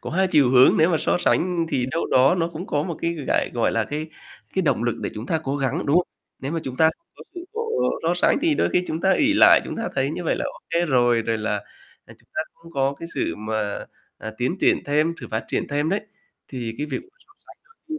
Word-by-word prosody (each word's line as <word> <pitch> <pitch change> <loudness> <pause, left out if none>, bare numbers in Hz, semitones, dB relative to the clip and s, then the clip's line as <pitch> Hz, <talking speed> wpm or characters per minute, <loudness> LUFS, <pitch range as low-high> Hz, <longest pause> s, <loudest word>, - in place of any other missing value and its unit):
có - - -6
hai 190 +3 +2
chiều 145 -7 +4
hướng. 130 0 +6
Nếu 160 +3 +4
mà 165 - +3
so - - +1
sánh 175 -1 +1
thì 125 -5 0
đâu 165 - -1
đó 130 +6 +4
nó 170 -2 0
cũng 170 +5 -6
có 145 - 0
một 170 -1 -4
cái, 170 - +1
gại - - +1
gọi 120 - +1
là, 115 -1 +1
cái 150 +5 -4 0.5
cái 190 - +1
động 150 -8 +1
lực 120 - 0
để - - -2
chúng 110 +4 -6
ta 160 - 0
cố 135 +1 -1
gắng, 135 -2 -1
đúng 145 +3 +3
không? 180 - +3 0.3
Nếu 135 +3 -4
mà 165 - -1
chúng 130 -1 -5
ta 160 0 +5
không 335 - -49
có - - -11
sự 350 - -6 0.6
so 165 +2 +1
sánh 175 - +3
thì 330 -2 +3
đôi - - +1
khi 180 - +2
chúng 160 - -3
ta 190 +1 +3
ỷ 295 +6 +3
lại, - - +7
chúng - - -6
ta - - -2
thấy - - 0
như - - -5
vậy - - +1
là - - -2
ô - - -6
kê 170 0 +2
rồi. 120 -5 +3
Rồi 115 0 -1
là, 105 -1 -1 0.5
ờ, - - -14
chúng - - -28
ta - - 0
không 165 0 -16
có 135 -1 0
cái 165 - -7
sự 85 - -1
mà, 110 -1 -3 0.3
à, 110 - -6
tiến 125 +9 0
triển - - +2
thêm, 155 +3 +1
sự 125 - -7
phát 110 +1 -2
triển - - -2
thêm 145 +2 0
đấy. 200 +2 +1 0.5
Thì 120 -4 -5
cái 150 - -2
việc 145 - -3 0.3
so 390 - -24
sánh - - -15 0.3
đôi 310 0 -4
150 Hz, 265 wpm, -23 LUFS, 125-170 Hz, 0.6 s, lại